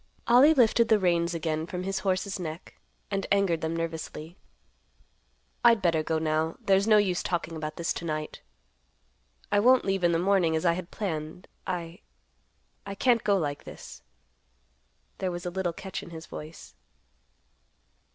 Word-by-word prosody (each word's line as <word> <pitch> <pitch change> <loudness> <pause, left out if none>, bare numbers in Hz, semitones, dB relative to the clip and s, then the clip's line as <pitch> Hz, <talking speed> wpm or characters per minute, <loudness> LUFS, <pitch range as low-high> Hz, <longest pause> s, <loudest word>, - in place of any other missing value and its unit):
Ollie 265 +7 +6
lifted 235 -2 +4
the 220 - +6
reins 170 -3 +1
again 160 0 -2
from 180 +1 -5
his 195 +1 -2
horse's 190 0 -1
neck, 165 0 -7 0.4
and 195 -1 -2
angered 195 -5 +2
them 160 +1 -2
nervously. 165 0 -5 1.3
"I'd 235 -2 +6
better 170 -4 +2
go 160 +1 -1
now; 160 +1 -1
there's 200 -3 +2
no 215 -1 +6
use 190 -4 +1
talking 170 -2 -3
about 155 -1 -5
this 170 - -1
to 170 - -6
night. 155 -1 -4 1.1
I 205 - +4
won't 250 +4 +5
leave 195 -2 0
in 175 - +4
the 165 - +2
morning, 180 -2 +2
as 160 - -1
I 170 - +4
had 180 0 -6
planned. 160 -3 -5 0.2
I—I 180 +2 -9
can't 235 +1 +2
go 200 -1 +3
like 145 -5 -3
this." - - -11 1.2
There 190 - -1
was 175 0 -6
a 175 - -3
little 185 -1 -1
catch 190 +2 -6
in - - -11
his 160 -1 -9
voice. 150 - -10
175 Hz, 160 wpm, -27 LUFS, 160-195 Hz, 1.3 s, Ollie